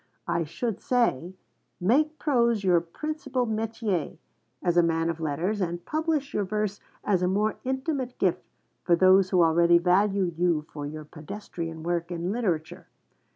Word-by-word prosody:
I 170 -1 0
should 215 +7 -4
say, 190 - 0 0.4
make 300 - +2
prose 235 -8 +2
your 180 -3 +4
principal 275 - -3
métier, 220 -5 -2 0.5
as 175 -1 +1
a 175 - +6
man 165 0 +1
of 165 - -8
letters, 165 +7 -1
and 175 -1 -3
publish 310 -3 -1
your 205 - 0
verse 210 +1 -2 0.2
as 190 -4 +1
a 180 - +2
more 210 +3 0
intimate 265 0 -2
gift 180 -2 +1 0.4
for 170 - +4
those 185 +1 +5
who 180 -3 +4
already 170 +1 +5
value 195 +3 +2
you 170 -3 +1
for 145 -1 -5
your 155 +1 -7
pedestrian 165 0 -7
work 170 0 -1
in 175 +1 -3
literature. 180 -9 -2
185 Hz, 155 wpm, -26 LUFS, 170-225 Hz, 0.5 s, a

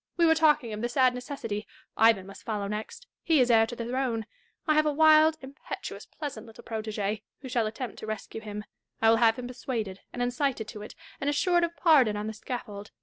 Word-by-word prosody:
We 340 - +5
were 320 - +6
talking 300 -7 +3
of 210 - -5
the 240 - -1
sad 255 0 +3
necessity. 245 -5 -5 0.2
— - - -43
Ivan 220 -4 +4
must 195 +1 -11
follow 210 -3 -3
next: 210 - -5 0.2
he 320 -3 +3
is 250 -1 +4
heir 225 -1 +5
to 240 - -6
the 235 - -5
throne. 240 -3 -1 0.4
I 310 - +3
have 305 0 +3
a - - +3
wild, 315 +1 +6
impetuous, 270 +2 -8
pleasant 270 -8 -7
little 225 - -13
protege, 215 -2 -3 0.2
who 265 - -8
shall 235 -3 +1
attempt 225 +1 -6
to 215 - -7
rescue 215 +1 -5
him. 210 -1 -6 0.4
I 225 0 +5
will 225 - +5
have 225 -1 +4
him 250 - -5
persuaded 230 -6 -4
and - - -7
incited 245 -2 -1
to 210 - -8
it, 210 - -9 0.2
and 280 - 0
assured 345 +4 +2
of 340 0 -2
pardon 265 -11 +5
on 210 - -3
the 220 - -4
scaffold. 210 -3 -6
235 Hz, 220 wpm, -28 LUFS, 215-285 Hz, 0.4 s, were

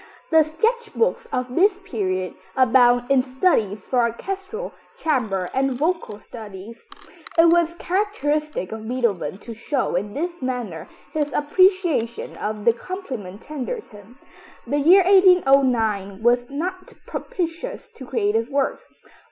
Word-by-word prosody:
The 320 0 +7
sketch 440 +10 -1
books 470 +2 0
of 250 -1 -2
this 395 +2 +3
period 185 - -3 0.2
abound 245 0 +4
in 270 -2 +5
studies 255 - 0
for 255 - 0
orchestral, 385 - -3 0.2
chamber 220 - -1
and 265 0 +1
vocal 310 - -1
studies. 215 0 -11 0.5
It 330 0 +7
was 340 0 +3
characteristic 305 - -1
of 220 0 -7
Beethoven 220 - -1
to 230 +3 -9
show 255 +5 -2
in 205 +4 -2
this 345 +2 -3
manner 230 -10 -4 0.3
his 295 -1 -1
appreciation 330 - +2
of 210 0 -4
the 235 - +6
compliment 240 - -7
tendered 305 - -5
him. 210 +3 -16 0.5
The 290 - 0
year 360 +7 +6
1809 265 - +4
was 245 +1 +3
not 365 +6 -5
propitious 355 +8 -4
to 440 - -12
creative 225 -2 0
work. 275 -1 0
260 Hz, 125 wpm, -22 LUFS, 225-345 Hz, 0.5 s, The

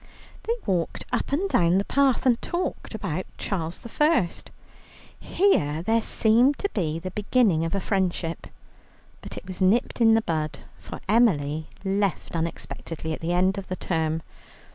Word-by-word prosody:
They 460 - +1
walked 180 -5 -1
up - - -1
and 340 +8 +1
down 175 - +3
the 200 - +1
path 275 -1 +2
and 240 -2 +3
talked 345 -9 -3
about 185 -4 -3
Charles 170 -3 -3 0.2
I. 300 - +4 0.9
Here 160 - +1
there 225 +4 +2
seemed 235 +6 +3
the 180 - -2
beginning 205 -5 +2
of 165 - -2
a - - +1
friendship, 185 -4 -1 0.7
but - - -9
it - - -8
was 185 0 -7
nipped 210 +6 +2
in 225 -1 +6
the 225 - +2
bud, 155 -4 -2 0.2
for 80 -1 -9
Emily 160 -9 +2 0.2
left 195 -2 -1
unexpectedly 165 -1 -4
at - - -5
the 170 +2 -1
end 185 +2 +2
of 195 - -9
the 185 - -3
term. 160 -3 -1
190 Hz, 150 wpm, -25 LUFS, 165-225 Hz, 0.9 s, in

